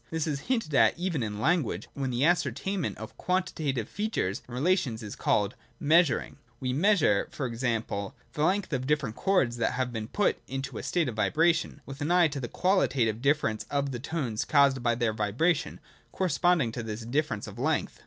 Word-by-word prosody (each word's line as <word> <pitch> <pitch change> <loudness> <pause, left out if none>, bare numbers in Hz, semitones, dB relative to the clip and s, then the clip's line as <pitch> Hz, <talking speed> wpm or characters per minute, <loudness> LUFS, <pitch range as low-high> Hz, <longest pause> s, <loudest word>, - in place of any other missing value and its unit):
This 160 -2 -1
is 150 -3 -2
hinted 225 - 0
at 135 - +4
even 170 -5 -1
in 105 -2 -3
language, 135 - 0
when 135 -2 -2
the 125 +3 +1
ascertainment 175 - 0
of 110 +1 -9
quantitative 160 - -1
features 205 - -2
and 120 - -8
relations 135 -6 +1
is 105 - -6
called - - +1 0.3
measuring. 160 0 +3 0.2
We 130 -1 -1
measure, 155 - +3
n.g. 125 -2 -3 0.7
the 150 - -1
length 190 +1 +1
of 130 -1 -1
different 140 -7 0
chords 140 -12 +1
that 115 - 0
have 125 -1 -2
been 110 -1 -4
put 205 - +1
into 135 -2 -4
a - - -5
state 170 -4 0
of 120 - -4
vibration, 160 +4 +2
with 135 +1 -9
an 145 - -1
eye 175 -2 +5
to 145 -1 -5
the 125 - -4
qualitative 125 - +1
difference 140 -6 +1
of 140 -1 -1
the 120 - -4
tones 130 -6 -2
caused 140 -3 +4
by 120 -1 +2
their 115 -2 0
vibration, 130 - 0 0.3
correspond 180 -3 +2
ing 115 - -2
to 120 - -4
this 110 0 -5
difference 120 -2 -1
of - - -10
length. - - -1
140 Hz, 185 wpm, -28 LUFS, 120-170 Hz, 0.7 s, eye